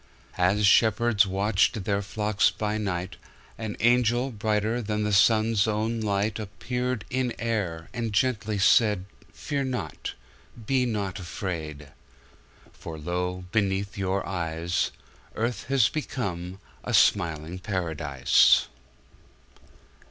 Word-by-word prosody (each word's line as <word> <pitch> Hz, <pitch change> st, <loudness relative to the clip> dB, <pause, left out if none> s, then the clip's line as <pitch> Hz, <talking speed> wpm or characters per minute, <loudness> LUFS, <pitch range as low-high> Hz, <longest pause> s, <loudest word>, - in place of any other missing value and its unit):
As 100 Hz, +4 st, +3 dB
shepherds 110 Hz, 0 st, +4 dB
watched 100 Hz, +2 st, +1 dB
their 100 Hz, +1 st, 0 dB
flocks 105 Hz, +1 st, +1 dB
by 105 Hz, 0 st, -2 dB
night, 95 Hz, -2 st, -3 dB, 0.4 s
An 110 Hz, -2 st, -5 dB
angel, 120 Hz, +2 st, +3 dB
brighter 110 Hz, +2 st, 0 dB
than 105 Hz, -1 st, -2 dB
the 105 Hz, 0 st, 0 dB
sun's 110 Hz, +1 st, +4 dB
own 110 Hz, +2 st, -1 dB
light, 105 Hz, +1 st, 0 dB
Appeared 125 Hz, +3 st, -3 dB
in 130 Hz, -1 st, -1 dB
air, 100 Hz, -8 st, -2 dB
And 115 Hz, -2 st, -3 dB
gently 105 Hz, -2 st, 0 dB
said, 105 Hz, -1 st, +4 dB, 0.3 s
Fear 140 Hz, -2 st, -3 dB
not, 120 Hz, -12 st, -4 dB, 0.5 s
be 130 Hz, +1 st, +1 dB
not 100 Hz, -4 st, -3 dB
afraid, 80 Hz, -6 st, -5 dB, 0.8 s
For 80 Hz, -1 st, -8 dB
lo! 90 Hz, +3 st, -3 dB
beneath 100 Hz, -1 st, 0 dB
your 95 Hz, 0 st, -1 dB
eyes, 85 Hz, -1 st, -1 dB, 0.5 s
Earth 115 Hz, +2 st, -2 dB
has 130 Hz, -4 st, +3 dB
become 95 Hz, -, -4 dB, 0.2 s
a -, -, 0 dB
smiling 85 Hz, -2 st, +2 dB
paradise. 80 Hz, -, +3 dB
105 Hz, 110 wpm, -26 LUFS, 90-115 Hz, 0.8 s, shepherds